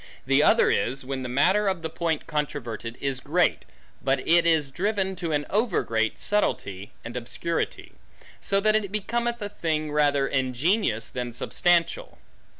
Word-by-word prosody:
The 135 Hz, +2 st, +4 dB
other -, -, +5 dB
is, 130 Hz, +2 st, 0 dB
when 135 Hz, 0 st, -3 dB
the 125 Hz, -, -4 dB
matter 185 Hz, +11 st, +3 dB
of 190 Hz, -4 st, -1 dB
the 160 Hz, -, -2 dB
point 165 Hz, -2 st, -2 dB
controverted, 125 Hz, -6 st, -4 dB
is 135 Hz, -2 st, -2 dB
great, -, -, +1 dB, 0.4 s
but 135 Hz, 0 st, 0 dB
it 170 Hz, +1 st, +5 dB
is 155 Hz, -4 st, +2 dB
driven 190 Hz, +3 st, -1 dB
to 170 Hz, -2 st, -3 dB
an 145 Hz, -1 st, 0 dB
over 215 Hz, -1 st, +1 dB
great 115 Hz, -1 st, 0 dB
subtilty, 100 Hz, -, -1 dB, 0.2 s
and 120 Hz, -, -7 dB
obscurity; 125 Hz, +7 st, -3 dB, 0.5 s
so 195 Hz, -, +2 dB
that 215 Hz, +1 st, +3 dB
it 205 Hz, -3 st, 0 dB
becometh 235 Hz, +3 st, -1 dB
a 205 Hz, -, -3 dB
thing 155 Hz, -6 st, -2 dB
rather 145 Hz, -2 st, +2 dB
ingenious, 130 Hz, -, 0 dB
than 125 Hz, -1 st, -5 dB
substantial. 175 Hz, -, +1 dB
155 Hz, 155 wpm, -25 LUFS, 130-190 Hz, 0.5 s, other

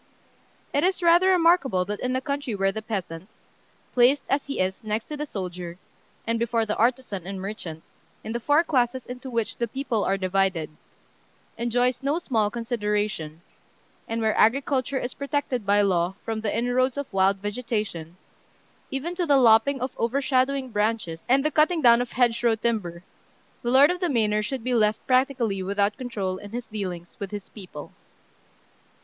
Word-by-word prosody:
It 285 Hz, -, +2 dB
is 370 Hz, 0 st, +1 dB
rather 345 Hz, +2 st, +5 dB
remarkable 335 Hz, -, +3 dB
that 205 Hz, +2 st, -4 dB
in 255 Hz, 0 st, -1 dB
a 260 Hz, -, 0 dB
country 280 Hz, -4 st, -3 dB
where 195 Hz, 0 st, +1 dB
the 220 Hz, -, -5 dB
peasant 190 Hz, -4 st, -5 dB, 0.6 s
placed 255 Hz, +3 st, +4 dB
as 275 Hz, +1 st, 0 dB
he 280 Hz, -, -4 dB
is 185 Hz, 0 st, +1 dB
next 215 Hz, +1 st, -2 dB
to 300 Hz, -, -4 dB
the 300 Hz, 0 st, -4 dB
soldier, 180 Hz, -5 st, -6 dB, 0.5 s
and 230 Hz, 0 st, 0 dB
before 230 Hz, -1 st, +1 dB
the 215 Hz, -, -2 dB
artisan 235 Hz, -6 st, 0 dB
and 195 Hz, 0 st, -5 dB
merchant, 185 Hz, -5 st, -6 dB, 0.4 s
in 220 Hz, -, -5 dB
the 235 Hz, -, -2 dB
four 290 Hz, +7 st, +3 dB
classes 255 Hz, -5 st, 0 dB
into 250 Hz, +1 st, -8 dB
which 230 Hz, -3 st, -2 dB
the 235 Hz, -, -1 dB
people 240 Hz, -3 st, -2 dB
are 195 Hz, -, +1 dB
divided 185 Hz, -4 st, 0 dB, 0.8 s
enjoys 245 Hz, +2 st, 0 dB
no 280 Hz, +4 st, 0 dB
small 225 Hz, -11 st, 0 dB
consideration, 210 Hz, -8 st, -2 dB, 0.7 s
and 225 Hz, 0 st, -2 dB
where 220 Hz, -1 st, +1 dB
agriculture 265 Hz, +3 st, +2 dB
is 250 Hz, -1 st, -3 dB
protected 280 Hz, -6 st, -2 dB
by 205 Hz, +1 st, +4 dB
law 180 Hz, -1 st, +1 dB
from 220 Hz, -1 st, -3 dB
the 215 Hz, 0 st, -1 dB
inroads 250 Hz, +3 st, +1 dB
of 285 Hz, -, -2 dB
wild 195 Hz, +1 st, +3 dB
vegetation, 205 Hz, -5 st, -4 dB, 0.7 s
even 275 Hz, +6 st, -3 dB
to 355 Hz, -1 st, -2 dB
the 285 Hz, -2 st, +5 dB
lopping 250 Hz, +3 st, +5 dB
of 255 Hz, +1 st, -2 dB
overshadowing 260 Hz, +1 st, +1 dB
branches 210 Hz, -6 st, -1 dB
and 270 Hz, +3 st, +4 dB
the 305 Hz, -, +2 dB
cutting 315 Hz, +3 st, +3 dB
down 235 Hz, 0 st, +7 dB
of 245 Hz, -, -5 dB
hedgerow 235 Hz, -2 st, +2 dB
timber, 210 Hz, -7 st, -2 dB, 0.6 s
the 240 Hz, -, -2 dB
lord 270 Hz, +5 st, +6 dB
of 360 Hz, -, -3 dB
the 355 Hz, -2 st, 0 dB
manor 215 Hz, -5 st, +2 dB
should 245 Hz, +3 st, -4 dB
be 250 Hz, +1 st, -1 dB
left 215 Hz, -2 st, +2 dB
practically 255 Hz, -6 st, +1 dB
without 200 Hz, +2 st, 0 dB
control 200 Hz, -7 st, -3 dB
in 205 Hz, -, -10 dB
his 240 Hz, +2 st, -5 dB
dealings 185 Hz, -6 st, -6 dB
with 200 Hz, -, -4 dB
his 205 Hz, -1 st, -7 dB
people. 180 Hz, -8 st, -10 dB
230 Hz, 170 wpm, -25 LUFS, 200-260 Hz, 0.8 s, down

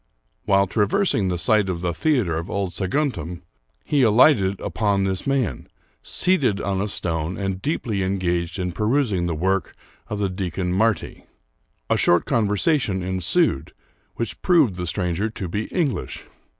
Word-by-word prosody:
While 100 Hz, 0 st, +4 dB
traversing 105 Hz, -, +1 dB
the 90 Hz, -1 st, -1 dB
site 100 Hz, +3 st, +2 dB
of 85 Hz, -2 st, -3 dB
the 90 Hz, -1 st, -1 dB
theater 120 Hz, -, +1 dB
of 85 Hz, -, -7 dB
old 100 Hz, -3 st, -2 dB
Saguntum, 95 Hz, -, -2 dB, 0.4 s
he 145 Hz, -2 st, +2 dB
alighted 110 Hz, -4 st, +4 dB
upon 100 Hz, -3 st, 0 dB
this 95 Hz, +2 st, -2 dB
man, 125 Hz, -, -1 dB, 0.3 s
seated 140 Hz, -, +1 dB
on 95 Hz, -2 st, -1 dB
a 105 Hz, -, -1 dB
stone, 85 Hz, -3 st, -2 dB
and 95 Hz, -1 st, -3 dB
deeply 115 Hz, -8 st, -2 dB
engaged 90 Hz, -2 st, -1 dB
in 90 Hz, -1 st, -2 dB
perusing 105 Hz, -, 0 dB
the 85 Hz, -, -2 dB
work 95 Hz, +2 st, -1 dB, 0.3 s
of 105 Hz, -, -4 dB
the 100 Hz, -1 st, 0 dB
deacon 90 Hz, -1 st, -3 dB
Marti. 110 Hz, +2 st, 0 dB, 0.6 s
A -, -, +2 dB
short 85 Hz, -1 st, +3 dB
conversation 105 Hz, -, +1 dB
ensued, 95 Hz, -, 0 dB, 0.4 s
which 115 Hz, -2 st, -4 dB
proved 155 Hz, -, +3 dB
the 90 Hz, -1 st, -4 dB
stranger 90 Hz, +3 st, -1 dB
to 100 Hz, -4 st, -5 dB
be 105 Hz, +6 st, -3 dB
English. 160 Hz, -8 st, -2 dB
100 Hz, 150 wpm, -22 LUFS, 90-115 Hz, 0.6 s, While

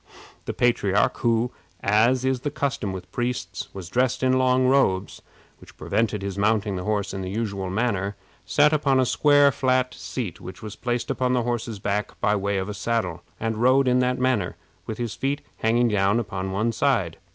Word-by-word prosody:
The -, -, -3 dB
patriarch, 105 Hz, -4 st, +2 dB
who, 115 Hz, +1 st, +1 dB, 0.3 s
as 115 Hz, +5 st, +3 dB
is 130 Hz, -1 st, +1 dB
the 145 Hz, -, -2 dB
custom 140 Hz, -8 st, -2 dB
with 95 Hz, -1 st, -8 dB
priests, 120 Hz, 0 st, -3 dB
was 95 Hz, -3 st, -8 dB
dressed 125 Hz, +6 st, 0 dB
in 130 Hz, 0 st, +3 dB
long 130 Hz, 0 st, +3 dB
robes, 100 Hz, -8 st, +1 dB, 0.4 s
which -, -, -16 dB
prevented 110 Hz, -3 st, -1 dB
his 100 Hz, 0 st, -4 dB
mounting 105 Hz, -1 st, +1 dB
the 90 Hz, -, -4 dB
horse 105 Hz, -2 st, -1 dB
in 95 Hz, -, -4 dB
the 95 Hz, -, -4 dB
usual 100 Hz, -3 st, -3 dB
manner, 100 Hz, -1 st, -1 dB, 0.3 s
sat 150 Hz, +1 st, +3 dB
upon 140 Hz, -3 st, +2 dB
a 130 Hz, -, +3 dB
square 145 Hz, +2 st, +4 dB
flat 130 Hz, 0 st, +1 dB
seat 105 Hz, -10 st, -5 dB
which 95 Hz, -, -9 dB
was 105 Hz, -2 st, -7 dB
placed 120 Hz, +1 st, -2 dB
upon 125 Hz, 0 st, 0 dB
the 125 Hz, -2 st, +1 dB
horse's 115 Hz, -2 st, -2 dB
back 100 Hz, +1 st, -3 dB
by 105 Hz, -, +2 dB
way 100 Hz, 0 st, -1 dB
of 100 Hz, +2 st, -3 dB
saddle, 105 Hz, -5 st, -2 dB, 0.2 s
and 115 Hz, -1 st, -2 dB
rode 130 Hz, +2 st, +4 dB
in 125 Hz, 0 st, +3 dB
that 125 Hz, 0 st, +1 dB
manner, 125 Hz, -8 st, 0 dB, 0.3 s
with 110 Hz, -, -4 dB
his 120 Hz, -2 st, -3 dB
feet 140 Hz, +2 st, -2 dB, 0.2 s
hanging 120 Hz, +2 st, +2 dB
down 100 Hz, +1 st, +2 dB
upon 95 Hz, -4 st, -4 dB
one 110 Hz, +4 st, 0 dB
side. 110 Hz, -8 st, 0 dB
115 Hz, 185 wpm, -24 LUFS, 100-125 Hz, 0.4 s, square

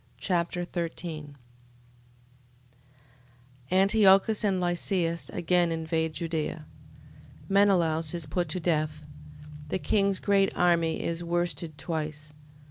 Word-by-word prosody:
2 -, -, -14 dB
Machabees -, -, -3 dB
Chapter 175 Hz, -1 st, 0 dB
13 165 Hz, -4 st, -5 dB, 2.3 s
Antiochus 195 Hz, +2 st, +4 dB
and 195 Hz, -3 st, +1 dB
Lysias 175 Hz, -1 st, -1 dB
again 175 Hz, 0 st, +1 dB
invade 160 Hz, 0 st, -1 dB
Judea. 160 Hz, -1 st, -3 dB, 0.8 s
Menelaus 175 Hz, -6 st, +2 dB
is 170 Hz, -2 st, -3 dB
put 175 Hz, +2 st, -2 dB
to 185 Hz, -, -2 dB
death. 155 Hz, -3 st, -1 dB, 0.6 s
The -, -, 0 dB
king's 195 Hz, 0 st, +1 dB
great 195 Hz, -1 st, +2 dB
army 170 Hz, -2 st, +2 dB
is 170 Hz, +1 st, -3 dB
worsted 170 Hz, -2 st, -2 dB
twice. 155 Hz, -1 st, -5 dB
170 Hz, 105 wpm, -27 LUFS, 160-185 Hz, 2.3 s, Antiochus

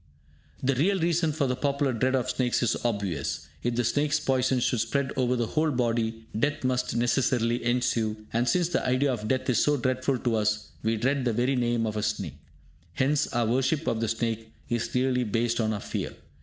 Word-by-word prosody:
The 135 Hz, +1 st, +3 dB
real 185 Hz, +9 st, +2 dB
reason 165 Hz, -1 st, +2 dB
for 145 Hz, -1 st, 0 dB
the 125 Hz, -1 st, 0 dB
popular 140 Hz, 0 st, 0 dB
dread 130 Hz, +3 st, +1 dB
of 130 Hz, -, 0 dB
snakes 125 Hz, -1 st, 0 dB
is 120 Hz, -, +2 dB
obvious. 100 Hz, -10 st, -2 dB
If 120 Hz, 0 st, -1 dB
the 120 Hz, -, +1 dB
snake's 145 Hz, +5 st, +1 dB
poison 130 Hz, -1 st, +1 dB
should 120 Hz, -1 st, +1 dB
spread 140 Hz, +4 st, 0 dB
over 125 Hz, -1 st, +1 dB
the 120 Hz, -1 st, 0 dB
whole 155 Hz, +7 st, +1 dB
body, 115 Hz, -3 st, -1 dB
death 145 Hz, +6 st, 0 dB
must 125 Hz, -2 st, 0 dB
necessarily 120 Hz, 0 st, +1 dB
ensue; 115 Hz, -3 st, 0 dB
and 120 Hz, +2 st, +2 dB
since 175 Hz, +2 st, +2 dB
the -, -, 0 dB
idea 130 Hz, +2 st, +2 dB
of 110 Hz, -3 st, -4 dB
death 130 Hz, +3 st, 0 dB
is 125 Hz, -4 st, +3 dB
so 150 Hz, 0 st, +3 dB
dreadful 130 Hz, +1 st, 0 dB
to 120 Hz, -2 st, 0 dB
us, 105 Hz, 0 st, 0 dB
we 110 Hz, 0 st, 0 dB
dread 135 Hz, +4 st, +1 dB
the 120 Hz, -2 st, +1 dB
very 125 Hz, +4 st, +1 dB
name 120 Hz, -2 st, +1 dB
of 110 Hz, -1 st, -2 dB
a -, -, 0 dB
snake. 100 Hz, -9 st, -3 dB, 0.5 s
Hence, 140 Hz, -, +1 dB
our 120 Hz, -1 st, +1 dB
worship 135 Hz, +7 st, +1 dB
of 110 Hz, -, 0 dB
the 115 Hz, -, 0 dB
snake 115 Hz, 0 st, -2 dB, 0.2 s
is 120 Hz, -1 st, -1 dB
really 125 Hz, 0 st, +2 dB
based 115 Hz, +2 st, 0 dB
on 110 Hz, -1 st, +1 dB
our 105 Hz, -, -2 dB
fear. -, -, -4 dB
125 Hz, 205 wpm, -27 LUFS, 115-135 Hz, 0.5 s, The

